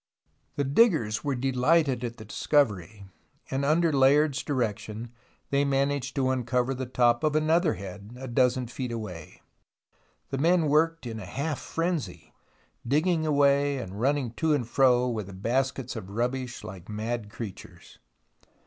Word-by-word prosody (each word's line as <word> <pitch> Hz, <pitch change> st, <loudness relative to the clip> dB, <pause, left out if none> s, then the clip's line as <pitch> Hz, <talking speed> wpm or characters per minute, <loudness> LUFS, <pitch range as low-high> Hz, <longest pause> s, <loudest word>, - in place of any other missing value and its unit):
The 145 Hz, -, 0 dB
diggers 140 Hz, -, +3 dB
were 140 Hz, -2 st, -1 dB
delighted 135 Hz, +1 st, +2 dB
at 120 Hz, -1 st, -4 dB
the 110 Hz, -, -10 dB
discovery, 105 Hz, -, 0 dB, 0.5 s
and 135 Hz, +1 st, -1 dB
under 160 Hz, +3 st, +2 dB
Layard's 140 Hz, +1 st, +4 dB
direction 115 Hz, -3 st, -3 dB, 0.4 s
they 140 Hz, 0 st, +3 dB
managed 140 Hz, 0 st, 0 dB
to 130 Hz, -2 st, +1 dB
uncover 125 Hz, 0 st, 0 dB
the 130 Hz, -1 st, -4 dB
top 120 Hz, +1 st, +2 dB
of 155 Hz, -1 st, +1 dB
another 160 Hz, +2 st, +2 dB
head 100 Hz, +3 st, -9 dB
a 130 Hz, -, -6 dB
dozen 125 Hz, +1 st, +2 dB
feet 125 Hz, +1 st, -5 dB
away. 95 Hz, -9 st, -7 dB, 0.9 s
The 135 Hz, -, -2 dB
men 165 Hz, 0 st, +3 dB
worked 165 Hz, +1 st, +2 dB
in 115 Hz, -2 st, -5 dB
a 100 Hz, -, -7 dB
half 140 Hz, +5 st, -3 dB
frenzy, 165 Hz, -, -3 dB, 0.5 s
digging 160 Hz, +4 st, +2 dB
away 140 Hz, -1 st, +3 dB
and 100 Hz, -4 st, -6 dB
running 135 Hz, -2 st, +1 dB
to 160 Hz, -2 st, +2 dB
and 125 Hz, -6 st, -2 dB
fro 125 Hz, -1 st, +3 dB
with 110 Hz, -5 st, -3 dB
the 100 Hz, -, -9 dB
baskets 130 Hz, +5 st, -1 dB
of 95 Hz, -4 st, -7 dB
rubbish 125 Hz, +4 st, -3 dB
like 95 Hz, 0 st, -9 dB
mad 110 Hz, +1 st, -3 dB
creatures. 105 Hz, -3 st, -10 dB
130 Hz, 150 wpm, -27 LUFS, 115-145 Hz, 0.9 s, Layard's